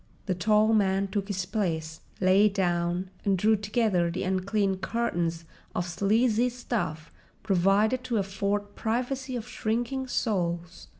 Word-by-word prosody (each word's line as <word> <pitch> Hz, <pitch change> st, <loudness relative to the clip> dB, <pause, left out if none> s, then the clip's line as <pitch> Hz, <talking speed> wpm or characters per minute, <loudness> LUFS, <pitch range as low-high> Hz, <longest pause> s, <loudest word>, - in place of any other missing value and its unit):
The 190 Hz, -, 0 dB
tall 215 Hz, +4 st, +3 dB
man 195 Hz, -2 st, +2 dB
took 195 Hz, 0 st, -2 dB
his 190 Hz, -3 st, -2 dB
place, 165 Hz, -6 st, -2 dB, 0.2 s
lay 195 Hz, +3 st, +5 dB
down, 180 Hz, -1 st, -1 dB
and 195 Hz, -2 st, +2 dB
drew 220 Hz, +4 st, +4 dB
together 205 Hz, -4 st, +1 dB
the 175 Hz, +2 st, -3 dB
unclean 190 Hz, +1 st, 0 dB
curtains 175 Hz, -5 st, -2 dB, 0.3 s
of 175 Hz, -, 0 dB
sleazy 220 Hz, +6 st, +2 dB
stuff 180 Hz, -11 st, -4 dB, 0.3 s
provided 200 Hz, +6 st, +2 dB
to 235 Hz, -3 st, 0 dB
afford 200 Hz, +1 st, -1 dB
privacy 255 Hz, +3 st, -2 dB
to 235 Hz, -, -3 dB
shrinking 245 Hz, +2 st, -2 dB
souls. 175 Hz, -7 st, -2 dB
200 Hz, 130 wpm, -27 LUFS, 180-220 Hz, 0.3 s, lay